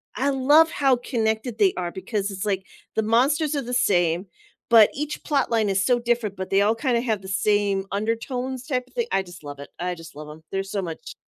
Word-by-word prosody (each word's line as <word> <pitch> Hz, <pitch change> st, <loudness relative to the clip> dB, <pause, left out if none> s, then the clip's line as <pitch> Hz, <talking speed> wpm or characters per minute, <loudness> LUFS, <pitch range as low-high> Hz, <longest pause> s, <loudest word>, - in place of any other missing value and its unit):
I 275 Hz, +2 st, +1 dB
love 290 Hz, +4 st, +5 dB
how 270 Hz, -3 st, +3 dB
connected 225 Hz, -1 st, -2 dB
they 200 Hz, -3 st, +4 dB
are 175 Hz, -1 st, -2 dB
because 200 Hz, +2 st, -3 dB
it's, 190 Hz, +1 st, -4 dB
like, 195 Hz, -2 st, -1 dB, 0.3 s
the -, -, +2 dB
monsters 280 Hz, +8 st, +2 dB
are 280 Hz, -, 0 dB
the 245 Hz, 0 st, -6 dB
same, 175 Hz, -6 st, +2 dB, 0.4 s
but 225 Hz, -3 st, +8 dB
each 300 Hz, +2 st, -4 dB
plot 285 Hz, -2 st, +1 dB
line 220 Hz, -3 st, +2 dB
is 190 Hz, -1 st, +1 dB
so 245 Hz, -1 st, +3 dB
different, 235 Hz, -4 st, -1 dB
but 190 Hz, -1 st, -5 dB
they 195 Hz, +1 st, +3 dB
all 215 Hz, +2 st, +3 dB
kinda 240 Hz, -1 st, 0 dB
have 220 Hz, -5 st, -1 dB
the 190 Hz, -, -10 dB
same 200 Hz, 0 st, +1 dB
undertones 245 Hz, +5 st, -3 dB
type 255 Hz, -3 st, -1 dB
of -, -, -25 dB
thing 475 Hz, -2 st, -1 dB
I 195 Hz, -, +1 dB
just 175 Hz, -3 st, -13 dB
love 145 Hz, -1 st, -8 dB
it 140 Hz, -, -9 dB
I 180 Hz, 0 st, -2 dB
just 165 Hz, -2 st, -12 dB
love 150 Hz, 0 st, -9 dB
'em, 155 Hz, +1 st, -12 dB
there's 195 Hz, 0 st, -3 dB
so 200 Hz, -, -1 dB
much 165 Hz, -3 st, -7 dB
215 Hz, 230 wpm, -24 LUFS, 190-250 Hz, 0.4 s, but